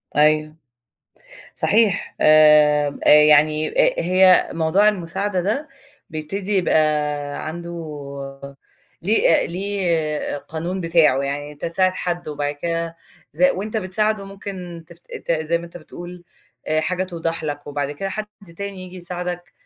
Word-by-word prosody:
أيوه، 155 +1 +3 1.0
صحيح، 210 -2 +1
آآ، 150 -1 +6 0.2
يعني 150 +1 +5
أ - - -10 0.3
أ - - -1
هي 185 +1 +5
موضوع 170 +6 +3
المساعدة 190 0 -1
ده 225 - -2 0.4
بيبتدي 190 +6 -3
يبقى 180 - +2 0.7
عنده 170 +1 -6 1.3
ليه 190 -3 +3
ليه 170 -6 -2
قانون 170 +6 -5
بتاعه، 165 -5 +3
يعني 145 +1 -4
أنت 145 - -10
تساعد 185 +2 +1
حد 175 -2 -4
وبعد 145 -1 -3
كده 165 +2 -3 0.4
ز 160 +5 -4
وأنت 200 +4 +2
بتساعده 210 +1 -1
ممكن 185 -4 -8
ت 170 - -12 0.2
ت - - -2
زي 160 +1 0
ما 170 - -9
أنت 170 0 -11
بتقول 175 +1 -10 0.4
آآ 155 0 +1
حاجة 185 +3 -1
توضح 165 -2 -4
لك 145 -1 -5
وبعد 145 -1 -3
كده 170 +7 -4
حد 215 +2 -4 0.3
تاني 200 -2 -6
ييجي 185 0 -10
يساعدك، 175 0 -6
170 Hz, 130 wpm, -21 LUFS, 155-185 Hz, 1.3 s, آآ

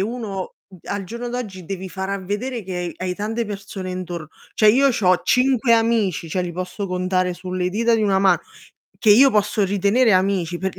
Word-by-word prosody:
uno 205 -3 -4 0.3
al 200 0 -3
giorno 235 +5 -6
d'oggi 215 -7 -5
devi 190 +2 -5
far 190 +1 -5
a 200 - -2
vedere 230 +5 -3
che 180 -2 -4
hai 185 0 -3
tante 225 +3 -2
persone 200 -2 -6
intorno 175 -3 -6 0.3
cioè 215 - +4
io 270 +5 +4
c'ho 185 -7 +2
5 250 -2 +3
amici, 225 -7 +1
cioè 185 - -1
li 175 -1 -4
posso 185 +3 -5
contare 185 0 -1
sulle 180 0 -3
dita 230 +4 +2
di 220 - 0
una 195 -2 +2
mano, 195 -1 +4 0.6
che 220 - +3
io 260 +6 +7
posso 210 0 +2
ritenere 205 +5 +2
amici, 185 -2 +1
per 190 0 -4
195 Hz, 185 wpm, -21 LUFS, 185-225 Hz, 0.6 s, io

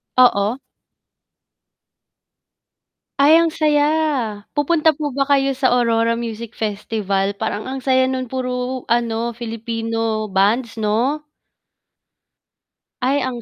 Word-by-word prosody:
Oo. 240 -2 +4 2.6
Ay, 305 +4 +6
ang 335 - +2
saya. 300 -2 +2 0.7
Pupunta 315 +2 +2
po 295 0 -3
ba 275 +1 -1
kayo 275 -1 +2
sa 255 -2 +2
Aurora 230 -1 +2
Music 230 -1 -5
Festival, 200 -2 -2
parang 215 +1 -4
ang 265 0 -5
saya 260 -1 +3
nung 260 -1 -3
puro 255 0 -3
ano 235 0 0
Filipino 225 -1 -3
bands 210 +6 +1
'no? 235 +8 0 1.8
Ay, 270 +3 +1
ang 250 -2 -3
240 Hz, 105 wpm, -20 LUFS, 225-265 Hz, 2.6 s, Ay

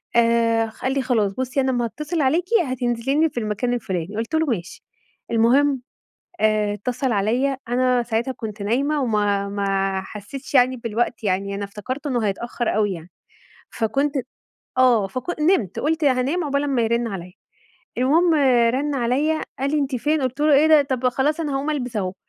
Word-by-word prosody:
آآ، 230 -1 +3
خ 220 - -15
قال 260 - 0
لي: 275 - 0
"خلاص 220 -6 +1
بُصي 260 +4 -1
أنا 265 0 +1
أمّا 240 -1 0
هأتصل 300 +7 -3
عليكِ 320 +7 +2 0.2
هتنزلي 245 0 -1
لي 320 - +4
في 245 - -4
المكان 220 +3 -1
الفلاني" 195 -5 -3
قُلت 230 +8 -2
له 320 0 +2
"ماشي." 200 - -4 0.5
المهم 255 +4 +3 0.6
آآ، 215 -1 +2
اتصل 250 +5 -2
عليّا 240 +7 +1
أنا 250 0 +2
ساعتها 230 +3 -1
كنت 220 -4 -7
نايمة 275 +8 0
وما 205 -4 0
ما 195 -1 -1
حسيتش 210 +9 -9
يعني 255 -1 +4
بالوقت 235 +1 -2
يعني 200 0 -1
أنا 200 - -4
افتكرته 255 +8 -6
إنه 240 -5 0
هيتأخر 235 +4 -2
أوي 210 -1 +2
يعني 170 0 -10 0.6
فكنت 275 +6 -1 0.7
آه، 240 -6 +4
فكن 280 - -3
نمت 270 - +1
قُلت 315 +1 0
هانام 275 +6 +1
عبال 280 -1 0
أمّا 270 -4 +1
يرن 235 +1 +1
عليّا 180 -3 -7 0.7
المهم 320 +7 +3 0.4
رن 285 +2 -1
عليّا 275 +6 +1 0.2
قال 275 +1 0
لي: 305 - +2
"أنتِ 275 -2 -1
فين؟" 300 +5 0
قُلت 260 +1 -2
له: 300 0 +4
"إيه 290 +3 +5
ده 310 -2 +7
طَب 260 -2 0
خلاص 280 +6 0
أنا 300 -4 -2
هأقوم 275 +2 -1
ألبس 250 -6 -3
أهو." 185 -2 -1
245 Hz, 175 wpm, -22 LUFS, 215-280 Hz, 0.7 s, ده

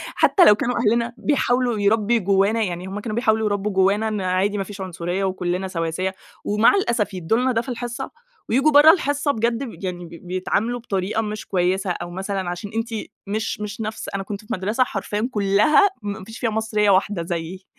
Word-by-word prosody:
حتّى 365 - +5
لو 210 - +8
كانوا 245 +3 -1
أهلنا 235 +1 +1
بيحاولوا 245 -3 +1
يربُّي 215 +3 +2
جوَّانا 200 +3 +2
يعني 180 -2 -4
هُم 195 +2 -5
كانوا 215 0 -4
بيحاولوا 220 -2 +2
يربُّوا 205 0 -1
جوَّانا 195 +3 +2
إن 215 -2 -2
عادي 185 +3 0
ما 195 - -1
فيش 200 0 -9
عنصرية 180 +1 -3
وكلُّنا 185 0 -1
سواسية، 185 +1 -2 0.3
ومع 210 - +4
الأسف 235 - 0
يدُّوا 180 +4 0
لنا 255 +1 +1
ده 230 -1 +1
في 265 - -9
الحصّة 245 +2 -4 0.4
وييجوا 270 +6 +3
برّه 295 +2 +9
الحصّة 290 -4 0
بجد 235 +1 -1
ب 235 -6 -9
يعني 180 -2 -4
ب - - -12 0.2
بيتعاملوا 205 +6 -1
بطريقة 210 -1 -2
مش 215 -1 -5
كويِّسة، 185 +1 0
أو 175 0 -5
مثلًا 190 0 -3
عشان 175 +4 -6
أنتِ 225 +1 -1 0.4
مش 215 +2 -2
مش 210 +1 -5
نفس 215 0 -5
أنا 195 - -2
كنت 200 +1 -6
في - - -22
مدرسة 210 +7 +1
حرفيًا 210 0 -3
كلّها 210 - +4
ما 205 -1 -5
فيش 225 +4 -10
فيها 235 - 0
مصريّة 215 -1 +1
واحدة 190 -2 +2
زيِّي، 175 +2 -5
210 Hz, 190 wpm, -22 LUFS, 190-230 Hz, 0.4 s, برّه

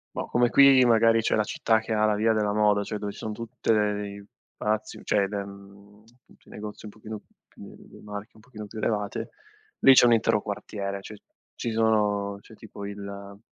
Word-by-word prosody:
boh, - - -3
come 120 -1 +2
qui 135 -2 +7
magari 115 -1 +4
c'è 110 - 0
la 105 - +2
città 110 +1 +1
che 110 - -5
ha 110 0 +2
la 105 -1 +2
via 110 +2 +2
della 105 -2 0
moda, 105 -1 +2
cioè 105 +1 -5
dove 100 0 -5
ci - - -14
son 110 - -5
tutte 115 0 -2
le 105 -1 0
i 100 0 -10 0.3
palazzi, 105 0 -2
cioè 100 -2 +1
de 105 - -5
mhmm, 100 +1 -15 0.2
punto - - -23
i - - -17
negozi 105 +1 -9
un - - -8
pochino 110 0 -9 0.3
più - - -14
le - - -16
marche 105 0 -8
un 110 - -18
pochino 110 -2 -10
più 110 +2 -10
elevate, 105 -2 -2 0.5
lì 135 - +8
c'è 125 - +7
un 120 - +5
intero 110 -2 +1
quartiere. 100 -1 -5
Cioè 105 +2 -10 0.4
ci 120 - -4
sono 105 -3 +1
c'è 110 - -16
tipo 105 -2 -10
il 100 0 -8
105 Hz, 210 wpm, -26 LUFS, 100-110 Hz, 0.5 s, lì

